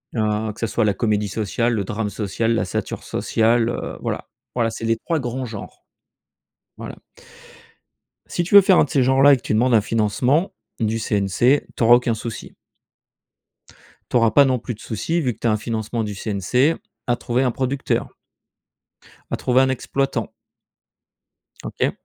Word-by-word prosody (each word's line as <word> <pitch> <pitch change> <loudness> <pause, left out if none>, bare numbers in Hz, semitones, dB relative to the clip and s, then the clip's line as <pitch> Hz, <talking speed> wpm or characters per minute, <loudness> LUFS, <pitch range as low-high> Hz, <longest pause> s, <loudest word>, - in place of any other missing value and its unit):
heu, 110 -1 0
que - - -16
ce 115 - -1
soit 110 +1 0
la 105 - +2
comédie 105 -1 0
sociale, 115 +4 -1
le 105 -3 -1
drame 105 0 -3
social, 110 +3 -1
la 115 - 0
satire 95 - -4
sociale, 115 +1 +1
heu, - - -5
voilà. - - -4 0.3
Voilà, 115 -2 +1
c'est 115 0 -6
les 115 0 +2
3 165 +7 -2
grands 130 0 -4
genres. 110 -4 -9 0.9
Voilà. - - -8 1.3
Si 175 - -2
tu 185 +4 0
veux 200 - +12
faire 190 -1 +4
un - - +5
de - - -15
ces 135 -1 +2
genres-là 135 +2 +5
et 135 - +4
que - - -15
tu - - -2
demandes 120 +3 +2
un 110 - +5
financement 115 - +1 0.3
du 115 0 0
CNC, 105 +6 +1
tu - - -1
auras 120 +1 +8
aucun 120 -1 +1
souci. 110 0 -7 1.6
Tu - - -3
auras 115 -2 +3
pas 140 +6 +6
non 130 -2 +1
plus 120 +1 -5
de - - -24
soucis, 165 +11 -2
vu 125 -5 0
que - - -24
tu - - -1
as - - +3
un 105 - +1
financement 110 +1 -3
du 105 -1 -5
CNC, 115 - +1 0.3
à 120 - +2
trouver 120 +2 -1
un 125 - +1
producteur 135 +3 -2 1.2
à - - -1
trouver 130 +1 +2
un 130 - +2
exploitant. 135 +1 -2 1.4
OK? - - -1
115 Hz, 180 wpm, -21 LUFS, 110-130 Hz, 1.6 s, veux